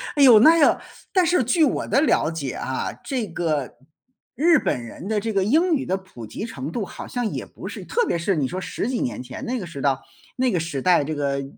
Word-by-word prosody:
哎 285 - +4
哟， 235 -5 +9
那 325 +7 +7
个 290 - +4 0.3
但 370 -2 +4
是 335 -5 +3
据 315 +8 +2
我 290 - +1
的 275 - +3
了 170 - +2
解 140 -5 -4
啊， 130 - -3
这 250 -6 -2
个 160 -5 -2 0.6
日 320 +5 +4
本 125 - -1
人 120 +10 -9
的 215 0 +1
这 225 +2 -3
个 195 -2 +1
英 320 - +3
语 270 - -2
的 185 - 0
普 185 -12 -11
及 155 - -6
程 145 - -6
度 220 - -2
好 - - -9
像 245 -2 -2
也 - - -5
不 - - -10
是 - - -7
特 480 -1 +1
别 - - 0
是 180 +3 0
你 145 -4 0
说 180 - -5
到 185 - -3
10 220 - -3
几 255 - -1
年 120 -1 -3
前 130 0 -8
那 250 0 -2
个 180 - -6
时 140 -5 -8
到 135 -2 +1 0.4
那 255 -1 +2
个 175 - +1
时 155 -5 -3
代， 175 -3 +4
这 155 - -3
个 140 -2 -1
190 Hz, 265 characters per minute, -23 LUFS, -, 0.6 s, 哟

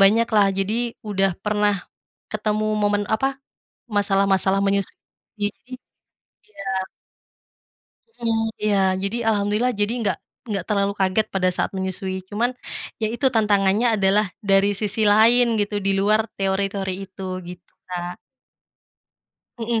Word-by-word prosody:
banyak 220 +4 +5
lah, 205 -2 +6
jadi 195 +3 0 0.3
udah 195 -1 +2 0.2
pernah 210 0 +2 0.6
ketemu 215 0 -1 0.2
momen 205 0 +2
apa, 270 +5 +1 0.7
masalah 200 -1 +3
masalah 190 +1 +2
menyusui, 200 0 0 0.5
jadi 205 - +1 0.9
iya. 200 -2 -11 1.6
Heeh, 225 -1 +1 0.2
iya. 205 -2 +2 0.2
Jadi 200 +4 -1
alhamdulillah, 210 +3 +2
jadi 205 +3 +1
enggak 195 -6 0 0.3
enggak 195 -4 -2
terlalu 200 -1 +1
kaget 190 +2 +2
pada 185 -1 +2
saat - - 0
menyusui. 190 0 -2
Cuman, 230 +5 0 0.5
iya 220 - +1
itu 250 +3 0
tantangannya 215 0 +2
adalah, 200 +2 +3 0.2
dari 195 0 +4
sisi 210 +1 0
lain 230 +4 +6
gitu, 205 0 -1
di 195 - +2
luar 215 +3 +3
teori 195 0 +1
teori 190 -2 -2
itu, 190 0 -8 0.2
gitu, 175 0 -11 0.2
Kak. 175 0 -4 1.4
Heeh, 230 0 0
205 Hz, 125 wpm, -22 LUFS, 195-215 Hz, 1.6 s, lah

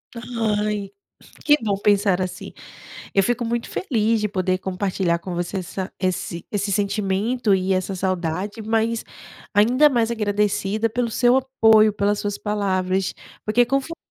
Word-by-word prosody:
Ai, 210 -4 -2 0.5
que 295 -1 +5
bom 205 -2 +1
pensar 200 -2 +2
assim. 185 0 -5 0.6
Eu 195 - +4
fico 245 +3 0
muito 235 0 -2
feliz 225 - 0
de 210 - +1
poder 185 -1 0
compartilhar 185 -2 -1
com 175 +1 -6
você 175 +3 -3
essa 185 +1 -5
esse 185 -2 -2
esse 205 -1 -1
sentimento 205 +3 +1
e 190 0 +1
essa 185 +1 -2
saudade, 185 +3 -2
mas 225 +1 0 0.5
ainda 250 +8 +5
mais 235 -3 +1
agradecida 210 0 0
pelo 235 +1 -1
seu 245 +2 +3
apoio, 225 -5 +4
pelas 205 0 0
suas 205 -1 -3
palavras, 190 -3 -1 0.3
porque 235 +3 +3
confortou 275 +5 -1
205 Hz, 140 wpm, -22 LUFS, 190-230 Hz, 0.6 s, que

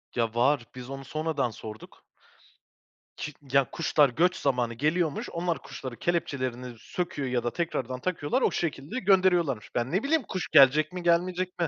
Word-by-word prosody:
Ya, 115 -2 0
var. 125 +1 +2
Biz 125 0 -8
onu 135 0 -7
sonradan 155 -3 -1
sorduk. 110 0 -11 1.1
Çık 140 -2 -8
ya, 135 -3 +4
kuşlar 150 -3 +3
göç 180 +9 +2
zamanı 125 -6 0
geliyormuş. 155 +4 0
Onlar 170 0 -2
kuşların 130 -3 -8
kelepçelerini 130 -7 -2
söküyor 150 -4 -3
ya 125 -1 0
da 120 - -2
tekrardan 130 -7 -2
takıyorlar, 165 -4 -1
o - - +3
şekilde 160 - -3
gönderiyorlarmış. 180 - +2
Ben, 120 +2 -1
ne 190 +8 +1
bileyim, 310 0 +2
kuş 185 - -3
gelecek 150 +1 +6
mi, 180 -1 -5
gelmeyecek 180 +2 +1
mi? 170 - +2
145 Hz, 160 wpm, -27 LUFS, 125-175 Hz, 1.1 s, gelecek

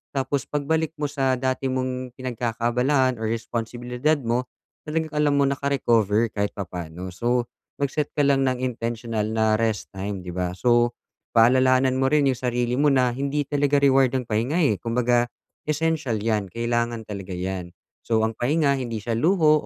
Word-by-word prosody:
tapos 135 0 -1
pagbalik 160 +2 -1
mo 150 - -2
sa 135 -3 0
dati 130 +1 -1
mong 130 -1 -3
pinagkakaabalahan 125 +1 0
or 110 - -1
responsibilidad 120 +5 -1
mo, 125 -1 -2 0.4
talagang 155 0 -2
alam 150 -1 +2
mo 140 - +4
naka-recover 115 -6 +1
kahit 100 -1 -1
papa'no. 90 -1 -6
So, 120 +5 0 0.3
mag-set 140 +1 -1
ka 145 - +4
lang 135 -1 +3
ng 130 0 -1
intentional 115 -3 -2
na 110 -1 +2
rest 110 -2 -1
time, 95 0 -4
di 90 - -5
ba? 90 0 -2
So, 120 +1 +3 0.4
paalalahanan 130 +2 +4
mo 135 - +3
rin 150 -1 +3
'yong 130 -2 +2
sarili 120 -1 -1
mo 150 0 +4
na, 130 -3 +3
hindi 140 +3 -1
talaga 145 0 +1
reward 135 -2 +4
ang 125 - -4
pahinga 115 +8 0
eh, 130 -10 +2
kumbaga 120 0 +1 0.4
essential 155 -6 0
‘yan, 105 -2 -1
kailangan 120 +2 -1
talaga 100 -3 -6
‘yan. 90 -1 -4 0.3
So 110 -1 +2
ang 110 0 -1
pahinga, 140 +2 +2
hindi 115 -4 -4
siya 115 +2 -2
luho 155 +1 +3
125 Hz, 160 wpm, -24 LUFS, 115-140 Hz, 0.4 s, mo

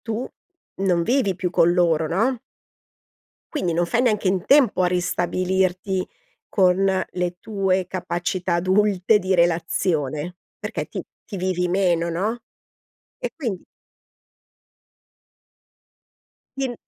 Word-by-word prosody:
tu 225 +2 -3 0.5
non 185 -3 +1
vivi 230 -1 +1
più 180 0 -2
con 175 -1 +4
loro, 165 -3 +2
no? 225 +9 +1 1.1
Quindi 180 - -1
non 175 +1 +1
fai 230 +7 +1
neanche 210 -5 +2
in 185 -1 0
tempo 270 -9 +5
a - - +4
ristabilirti 185 +1 0 0.4
con 180 -3 +3 0.3
le 180 -1 -2
tue 190 -3 0
capacità 180 0 -2
adulte 190 +3 +3
di 190 -1 0
relazione, 165 -2 0 0.2
perché - - -4
ti - - -5 0.2
ti 205 - -7
vivi 180 -1 0
meno, 175 -2 +1
no? 215 +8 -2 0.8
E - - -3
quindi 230 - -4 2.9
Ti 270 - 0
n 245 - -5
185 Hz, 115 wpm, -23 LUFS, 175-200 Hz, 2.9 s, tempo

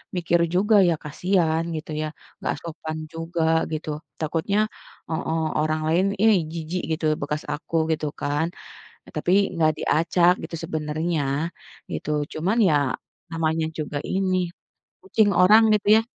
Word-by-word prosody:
mikir 170 -1 +2
juga 200 +5 +3
ya 165 - +2
kasihan, 165 +1 +1
gitu 155 0 -6
ya. 155 - -1 0.3
Enggak - - -1
sopan 160 -1 -5 0.2
juga, 165 0 -2 0.3
gitu. 155 0 -4 0.3
Takutnya 165 +5 -1 0.5
heeh, 160 0 -1 0.2
orang 155 0 0
lain 170 +4 +3 0.2
"ih 215 -4 +5
jijik 170 +2 -3 0.2
gitu 160 - -4 0.2
bekas 150 +1 -2
aku," 155 +2 -6 0.2
gitu 155 -1 -1
kan. 145 +3 0 0.7
Tapi, 175 - 0 0.2
enggak 155 -1 +3
diacak 170 +2 +3
gitu - - -7
sebenarnya, 155 +1 -1 0.7
gitu. - - -4 0.2
Cuman 190 +9 0
ya, 155 - +3 0.6
namanya 160 -1 0
juga 150 -1 -3
ini 190 -1 0 0.7
kucing 220 - +3
orang 215 +5 +7
itu 205 -1 0
ya - - +4
165 Hz, 135 wpm, -24 LUFS, 155-180 Hz, 0.7 s, orang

